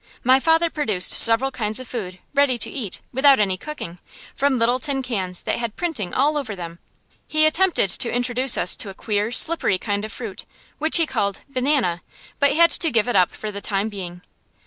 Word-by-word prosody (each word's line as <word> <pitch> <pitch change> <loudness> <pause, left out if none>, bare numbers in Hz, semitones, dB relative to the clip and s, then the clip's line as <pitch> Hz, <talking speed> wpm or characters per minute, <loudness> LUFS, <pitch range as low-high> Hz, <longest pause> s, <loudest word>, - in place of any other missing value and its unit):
My 260 +2 +4
father 325 +3 +1
produced 215 -12 +1
several 230 +4 +6
kinds 215 -2 -2
of 255 - -9
food, 190 -7 -7 0.2
ready 280 -3 +2
to - - +2
eat, 225 -9 -6
without 270 0 +4
any 195 -3 0
cooking, 185 - -9 0.3
from 280 -1 0
little 240 +2 +1
tin 275 -2 -3
cans 190 -8 -4
that - - -3
had 235 -2 -5
printing 300 - -4
all 295 +3 0
over 235 -8 -6
them. 170 -2 -9 0.5
He 310 0 +2
attempted 325 - +2
to 235 - +2
introduce 245 +1 +2
us 180 - +3
to 205 - -2
a 190 - -10
queer, 210 +1 -3
slippery 245 - +3
kind 205 +1 -4
of 215 - -7
fruit, - - -8 0.3
which 315 +3 +5
he 330 - +3
called 200 -9 -3
"banana," 255 - -1 0.4
but 280 - +2
had 335 +1 +4
to 330 - +2
give 230 -4 0
it 245 - -2
up 180 -2 +3
for 215 - -8
the 200 0 -8
time 200 +1 -2
being. 180 -3 -9
240 Hz, 200 wpm, -21 LUFS, 200-285 Hz, 0.5 s, several